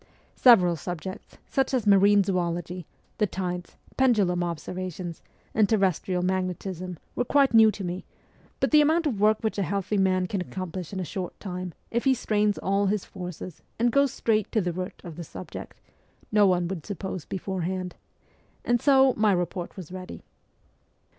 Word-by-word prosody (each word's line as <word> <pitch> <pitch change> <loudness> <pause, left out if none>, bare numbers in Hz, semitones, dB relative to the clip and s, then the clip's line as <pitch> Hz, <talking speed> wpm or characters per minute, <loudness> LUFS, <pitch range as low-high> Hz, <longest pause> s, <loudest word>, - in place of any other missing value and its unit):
Several 185 -9 +6
subjects, 175 +4 -7
such 270 0 0
as 240 -4 0
marine 200 0 +6
zoology, 175 -2 -2 0.3
the 210 - +3
tides, 180 -2 -4 0.2
pendulum 205 -9 +3
observations, 175 +1 -5 0.3
and 215 -2 +3
terrestrial 185 -3 +1
magnetism, 185 -1 -2 0.2
were - - +1
quite 275 +1 +3
new 220 -1 +8
to 205 -2 -4
me; 180 +1 -4 0.6
but - - +1
the 300 -1 +7
amount 320 +3 +3
of 245 -9 -1
work 215 +1 +5
which 220 -2 -1
a - - +2
healthy 200 +3 -1
man 185 -1 +2
can 185 +1 -2
accomplish 185 -2 -5
in 195 - -4
a 185 - -2
short 180 +2 -5
time, 180 -3 -5 0.2
if 235 +3 -1
he 265 -1 +5
strains 210 -3 +1
all 195 +1 +1
his 205 0 0
forces 180 -2 -8 0.2
and 240 +1 +2
goes 280 +1 +3
straight 215 -5 0
to 225 - +2
the 180 -3 -1
root 185 +1 -5
of 170 -3 -9
the 175 - -5
subject, 90 - -9 0.5
no 210 -1 +5
one 180 -2 +2
would 175 -4 -5
suppose 190 -3 -5
beforehand 185 0 -3 0.7
and 240 -1 +2
so 265 -2 +5
my 215 -1 +3
report 175 0 -2
was 180 -3 -8
ready. 185 0 -8
190 Hz, 165 wpm, -26 LUFS, 180-215 Hz, 0.7 s, new